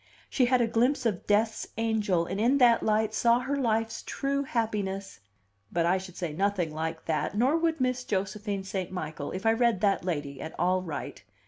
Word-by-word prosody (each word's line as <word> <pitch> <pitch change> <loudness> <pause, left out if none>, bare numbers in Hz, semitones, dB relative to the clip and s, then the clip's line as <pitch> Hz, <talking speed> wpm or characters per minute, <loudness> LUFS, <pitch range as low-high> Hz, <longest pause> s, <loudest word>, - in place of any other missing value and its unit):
She 255 - +3
had 250 0 +3
a 235 - +2
glimpse 245 +4 +1
of 210 -6 -1
Death's 220 +2 +1
angel, 215 -6 +1
and 195 +4 -3
in 250 +5 +4
that 240 -3 +5
light 215 0 +1
saw 235 +1 +4
her 265 +3 -2
life's 225 -4 0
true 280 0 -2
happiness!" 205 - -2 0.5
But 170 -1 +1
I 180 +2 +3
should 185 -2 -10
say 170 -4 -3
nothing 185 -2 0
like 160 +1 -4
that, 165 +5 -1
nor 260 +7 +3
would 330 -1 +1
Miss 255 -1 0
Josephine 200 -1 -2
St. 190 -1 -4
Michael, 155 -5 -5
if 185 +4 -5
I 225 - +5
read 235 -3 +2
that 200 -4 +2
lady 145 -6 -3
at 160 - -7
all 185 +1 +2
right. 160 - -6
210 Hz, 195 wpm, -28 LUFS, 185-235 Hz, 0.5 s, that